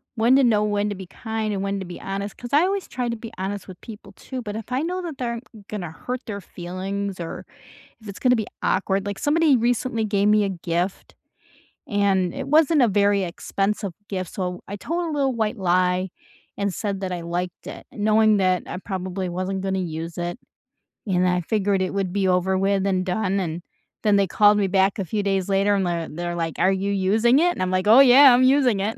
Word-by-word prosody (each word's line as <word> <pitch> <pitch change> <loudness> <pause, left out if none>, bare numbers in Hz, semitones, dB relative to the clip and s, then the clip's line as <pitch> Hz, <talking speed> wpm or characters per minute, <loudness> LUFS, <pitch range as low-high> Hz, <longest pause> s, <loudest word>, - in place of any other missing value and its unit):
when 235 +4 +4
to 275 - +5
know 215 -3 +3
when 205 0 0
to 205 - -4
be 185 -1 -9
kind, 220 0 -4
and 195 0 -2
when 200 0 -2
to 190 - -5
be 175 - -9
honest, 200 +1 -5
'cause 240 +2 -9
I 295 - +6
always 390 0 -1
try 245 -2 -3
to 235 - -2
be 230 0 -9
honest 195 +1 -4
with 185 -2 -12
people 210 -3 -11
too, 255 +4 -7
but 210 -1 -5
if 225 +2 -7
I 260 +3 0
know 365 +2 -2
that 330 -5 -6
they're 240 -2 -2
m 235 - -6 0.3
gonna 185 -6 -5
hurt 250 +9 -5
their 200 -2 -5
feelings, 190 +2 -5
or 165 - -6 0.6
if 215 - -13
it's 200 - -7
gonna 250 -1 +4
be 220 -3 -2 0.2
awkward- 195 +1 0
like, 200 -1 -4
somebody 300 -1 +3
recently 235 -1 0
gave 205 -1 +1
me 210 0 +4
a 200 - 0
gift, 175 +1 -3 0.7
and 195 -3 +1
it - - -5
wasn't 305 0 +4
a 240 - +5
very 200 0 +2
expensive 195 +2 -2 0.2
gift, 185 -3 -4
so 180 -2 -4
I 200 - -5
told 335 - -3
a - - -3
little 270 -2 +1
white 220 -2 -1
lie, 180 0 +1 0.5
and 200 -2 -1
said 200 -3 -3
that 185 -1 -3
I 175 -1 -3
liked 175 +1 -4
it, - - -9
knowing 215 0 +3
that 185 -1 +1
I - - -5
probably 185 -1 -4
wasn't 185 +2 -3
gonna 190 0 -1
use 165 -1 -5
it, 175 +6 -4 0.7
and 180 -1 +2
I 180 0 +2
figured 200 +1 0
it 185 - -2
would 195 -2 -1
be 195 -2 +1
over 185 +1 +2
with 195 0 +1
and 185 -1 0
done, 195 +1 0
and 170 -1 -3 0.4
then 210 -1 +4
they 195 -1 +2
called 210 +3 +4
me 200 -2 +1
back 195 +2 +2
a - - 0
few 205 +4 -2
days 195 -1 0
later, 200 +1 +2
and 190 -2 0
they're 170 -1 -2
they're 175 +2 -4
like, 165 -2 -3
"Are 185 +2 +4
you 195 +1 -1
using 220 +7 +3
it?" 350 +1 +3
and - - -6
I'm 185 - 0
like, 185 +1 0
"Oh, 230 +5 +8
yeah, 270 0 +8
I'm 250 +1 +4
using 255 -6 +4
it!" 215 +3 -2
200 Hz, 230 wpm, -23 LUFS, 185-220 Hz, 0.7 s, Oh